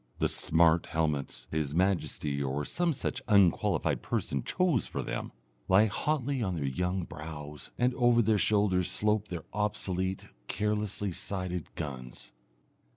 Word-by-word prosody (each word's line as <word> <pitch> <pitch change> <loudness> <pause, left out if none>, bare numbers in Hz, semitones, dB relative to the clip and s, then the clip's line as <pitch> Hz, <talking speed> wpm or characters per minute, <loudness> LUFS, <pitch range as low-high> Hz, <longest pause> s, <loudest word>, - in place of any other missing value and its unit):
The - - +2
"smart" 80 0 +3
helmets 75 -4 -1
His 75 -2 -1
Majesty, 80 -6 0
or 70 +2 -1
some 175 0 0
such 130 -3 -3
unqualified 100 -6 +3
person, 70 - -2
chose 175 - +1
for - - -3
them, - - -4 0.4
lie 95 +3 +6
hotly 140 +4 -1
on 95 -5 -1
their 75 -4 -2
young 90 +7 -1
brows, 75 -2 -8
and 125 +1 +2
over 120 -2 +4
their 110 -1 +3
shoulders 100 -4 +2
slope 105 0 +1
their 85 -4 -6
obsolete, 95 -2 -1 0.2
carelessly 105 -1 -1
sighted 90 -2 -3
guns. 65 -7 -6
95 Hz, 135 wpm, -30 LUFS, 80-105 Hz, 0.4 s, lie